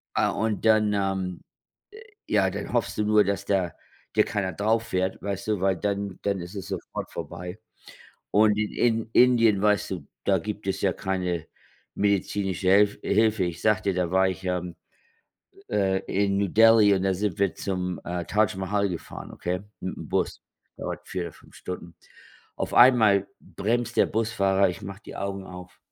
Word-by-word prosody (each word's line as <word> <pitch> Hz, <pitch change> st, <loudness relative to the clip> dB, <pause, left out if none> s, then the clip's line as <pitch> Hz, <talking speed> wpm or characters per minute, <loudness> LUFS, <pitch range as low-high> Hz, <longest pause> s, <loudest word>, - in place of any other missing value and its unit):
Ah, -, -, +3 dB
und 110 Hz, 0 st, -2 dB
dann, 110 Hz, -1 st, +4 dB
äh 95 Hz, -3 st, -1 dB, 0.9 s
ja, 95 Hz, -3 st, +3 dB
dann 100 Hz, +2 st, -6 dB
hoffst 120 Hz, -2 st, 0 dB
du 105 Hz, -, +2 dB
nur, 105 Hz, 0 st, +4 dB
dass 100 Hz, 0 st, -2 dB
da 95 Hz, -4 st, 0 dB, 0.4 s
dir -, -, +5 dB
keiner 100 Hz, -3 st, -2 dB
drauffährt, 105 Hz, -3 st, 0 dB
weißt 100 Hz, +1 st, -4 dB
du, 105 Hz, -4 st, 0 dB
weil 95 Hz, -1 st, +2 dB
dann 100 Hz, 0 st, -3 dB
dann 100 Hz, -2 st, -1 dB
ist 90 Hz, +4 st, -8 dB
es 95 Hz, 0 st, -6 dB
sofort 95 Hz, -3 st, -5 dB
vorbei. 90 Hz, +2 st, -7 dB, 0.7 s
Und 105 Hz, 0 st, +4 dB
in 105 Hz, -1 st, -1 dB
in 115 Hz, -2 st, +1 dB
Indien, 115 Hz, -5 st, +5 dB
weißt 105 Hz, -1 st, +2 dB
du, 90 Hz, -7 st, -5 dB, 0.2 s
da 95 Hz, -2 st, +2 dB
gibt 105 Hz, +2 st, -6 dB
es 95 Hz, 0 st, -1 dB
ja 95 Hz, -, +2 dB
keine 90 Hz, -4 st, -2 dB, 0.5 s
medizinische 100 Hz, -2 st, 0 dB
Helf 100 Hz, +1 st, +4 dB
Hilfe. 110 Hz, -2 st, +2 dB
Ich 85 Hz, -1 st, -5 dB
sage 110 Hz, -3 st, +2 dB
dir, 100 Hz, -, +1 dB
da 90 Hz, -2 st, -1 dB
war 95 Hz, 0 st, +4 dB
ich, 95 Hz, +1 st, -6 dB
ähm, 90 Hz, -1 st, -2 dB, 1.0 s
äh, 95 Hz, -2 st, +2 dB
in 100 Hz, 0 st, +1 dB
New 100 Hz, -1 st, +1 dB
Delhi 110 Hz, 0 st, +6 dB
und 95 Hz, -, -1 dB
da 95 Hz, 0 st, +2 dB
sind 100 Hz, -1 st, -2 dB
wir 100 Hz, -2 st, +2 dB
zum, 90 Hz, -2 st, -3 dB
äh, 90 Hz, 0 st, -3 dB
Taj 110 Hz, +2 st, +1 dB
Mahal 100 Hz, +2 st, 0 dB
gefahren, 85 Hz, -3 st, -7 dB
okay, 90 Hz, +1 st, -3 dB, 0.2 s
mit'm 95 Hz, -, -4 dB
Bus, -, -, -1 dB, 0.4 s
dauert -, -, -6 dB
4 95 Hz, -, -3 dB
oder 85 Hz, -3 st, -6 dB
5 -, -, -20 dB
Stunden. 85 Hz, -2 st, -7 dB, 0.6 s
Auf -, -, -3 dB
einmal 110 Hz, -6 st, +6 dB
bremst 120 Hz, +3 st, -2 dB
der -, -, +5 dB
Busfahrer, 100 Hz, -4 st, +1 dB
ich 90 Hz, 0 st, -6 dB
mache 100 Hz, +2 st, -8 dB
die -, -, -9 dB
Augen 100 Hz, -1 st, -4 dB
auf. 90 Hz, -1 st, -11 dB
100 Hz, 175 wpm, -26 LUFS, 95-105 Hz, 1.0 s, Delhi